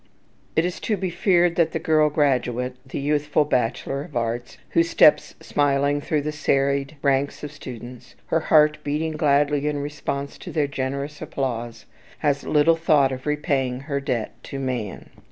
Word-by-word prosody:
It 160 - +3
is 180 - -3
to 215 - -1
be 185 -1 -2
feared 175 -1 +2
that 165 -2 +2
the - - 0
girl 155 -1 +3
graduate, 125 -4 0
the 130 - -7
youthful 150 +1 +1
bachelor 135 +1 -1
of 150 -5 -6
arts 120 +1 -3
who 165 - +4
steps 165 -2 +4
smiling 145 0 +1
through 150 0 -1
the 150 - -2
serried 140 0 0
ranks 140 +1 +1
of 145 - -5
students, 125 -3 -10 0.2
her 165 - +4
heart 150 -1 +4
beating 150 +2 -1
gladly 145 -1 +2
in 150 -1 -1
response 140 -1 -4
to - - -8
their 150 -3 +1
generous 140 +2 -4
applause, 120 -4 -4 0.4
has 140 -1 +1
little 155 +2 +4
thought 150 -4 +3
of 130 +2 -6
repaying 140 -4 0
her 140 0 -2
debt 130 -6 -2
to 140 - -6
man. 125 -7 -4
145 Hz, 165 wpm, -23 LUFS, 130-150 Hz, 0.4 s, who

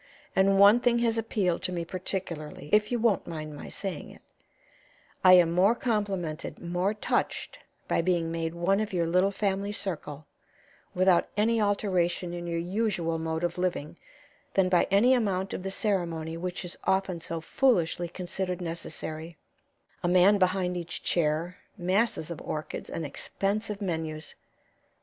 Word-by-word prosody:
And 195 +1 +4
one 200 +4 +7
thing 240 -1 +3
has 230 0 +1
appealed 200 -6 0
to - - -1
me 170 -2 -3
particularly, 170 -5 -5
if 210 +1 +4
you 245 - +1
won't 225 -4 +1
mind 155 -2 -6
my - - -8
saying 190 -7 -5
it: - - -15 1.0
I 185 -1 +9
am 175 -2 +6
more 190 +6 +4
complimented, 200 -10 -2
more 180 +4 -1
touched, 210 - -2 0.3
by - - +2
being 170 -2 0
made 165 0 -3
one 185 +4 +2
of 215 -2 -3
your 170 -2 +1
little 180 +4 +3
family 200 0 -1
circle, 155 -7 -4 0.7
without 185 -1 +4
any 225 +2 +3
alteration 185 -4 0
in 175 0 -5
your 170 0 -2
usual 175 -2 -1
mode 160 +1 -2
of 175 +1 -1
living, 175 -5 -2 0.6
than 190 -1 +4
by 180 -1 +3
any 210 +7 +5
amount 195 -6 0
of - - -4
the 195 - -4
ceremony 170 -6 -1
which 180 +2 -4
is 175 - -5
often 190 -3 +1
so 165 0 -4
foolishly 175 -3 +1
considered 180 0 -4
necessary 165 -1 -5 0.6
a - - 0
man 185 +3 +5
behind 185 -1 +1
each 170 -1 -5
chair, 165 +2 0 0.2
masses 185 -1 0
of 170 - -6
orchids, 155 0 -5
and 165 - -4
expensive 200 +7 -2
menus." 160 -4 -4
180 Hz, 155 wpm, -28 LUFS, 165-200 Hz, 1.0 s, I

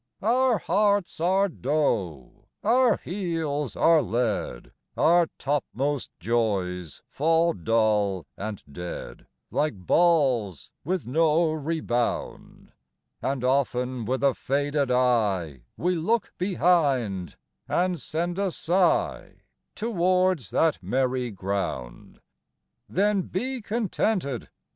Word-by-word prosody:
XIX. 215 - -1
Our 255 -1 +3
hearts 205 -4 +1
are 190 +4 +3
dough, 120 - -2 0.2
our 245 +2 +4
heels 165 - -3
are 165 -2 +5
lead, 110 - -2 0.3
Our 170 0 +4
topmost 140 0 -2
joys 90 -6 -1
fall 165 +3 +2
dull 105 -2 +1
and 105 0 -6
dead 90 +4 -7 0.2
Like 150 -5 0
balls 130 - +2
with 180 +2 -2
no 160 +4 +2
rebound! 150 -6 -3 0.5
And 135 -2 -2
often 125 -2 0
with 130 +4 -1
a 140 -1 +4
faded 140 +1 -1
eye 105 - +1
We 180 +1 0
look 205 +7 0
behind, 145 - +1 0.3
and 180 -1 0
send 175 +4 -3
a 200 -1 +1
sigh 180 +1 0 0.3
Towards 185 - +1
that 160 -8 +1
merry 125 +5 0
ground! 95 - -4
XX. - - -27 0.7
Then 200 +1 +2
be 250 +8 -3
contented. 205 - -1
145 Hz, 100 wpm, -26 LUFS, 115-180 Hz, 0.7 s, are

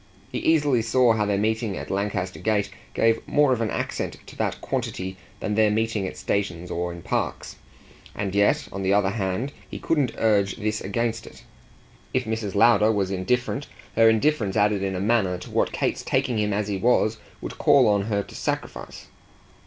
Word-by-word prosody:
He - - -2
easily 145 -6 +3
saw 115 +1 +3
how 105 -2 0
their 100 -1 +1
meeting 110 0 -1
at - - -6
Lancaster 95 -2 -2
Gate 105 -2 0 0.2
gave 115 0 +3
more 145 -3 +4
of 120 - -2
an 110 - 0
accent - - -3
to - - -12
that - - -2
quantity 95 0 -3 0.2
than 105 - -2
their 110 0 +4
meeting 110 -2 0
at - - -7
stations 90 -3 -2
or 90 +1 -2
in 85 -1 -9
parks; - - -3 0.6
and 100 -2 -3
yet 105 +9 +2
on 100 - -5
the 95 +1 +2
other 100 -2 +2
hand 105 +6 -2 0.2
he - - -6
couldn't 145 -7 0
urge 100 -3 +2
this 110 0 -2
against 115 +3 -2
it. - - -14 0.7
If 130 - +2
Mrs. 110 -3 -3
Lowder 110 0 +5
was 100 -3 0
indifferent 125 +9 -1 0.3
her 115 0 +6
indifference 110 -3 +1
added 105 -1 +2
in 95 -1 -1
a - - -2
manner 100 -3 +1
to 90 - -10
what - - +1
Kate's - - -1
taking 120 -3 0
him 105 0 0
as 105 0 -1
he 100 -2 -2
was 110 +1 +2 0.2
would - - -7
call 140 -4 +5
on 100 -1 +2
her 100 -2 0
to - - -14
sacrifice. - - -4
105 Hz, 190 wpm, -24 LUFS, 100-115 Hz, 0.7 s, her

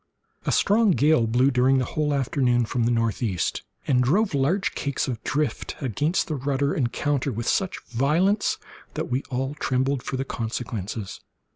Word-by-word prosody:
A - - +3
strong 215 +2 +3
gale 145 -6 +3
blew, 125 +5 +3
during 130 +1 +3
the 130 - +1
whole 150 +3 -1
forenoon, 125 -2 +1
from 120 +1 -1
the 120 - +2
northeast, 115 -5 0 0.2
and 125 -2 +3
drove 190 - +2
large 150 +9 +1
cakes 140 0 -2
of 120 -4 -3
the - - -5
drift 145 -5 -1
against 145 - 0
the 155 - -2
rudder 140 0 0
and 125 -5 0
counter 145 -2 0
with 115 +1 -4
such 190 -2 0
violence 160 - +1 0.4
that - - -3
we 130 +2 +1
all 135 +2 -2
trembled 135 -1 0
for 130 - -4
the 135 - -2
consequences. 110 -5 -4
130 Hz, 170 wpm, -25 LUFS, 120-145 Hz, 0.4 s, A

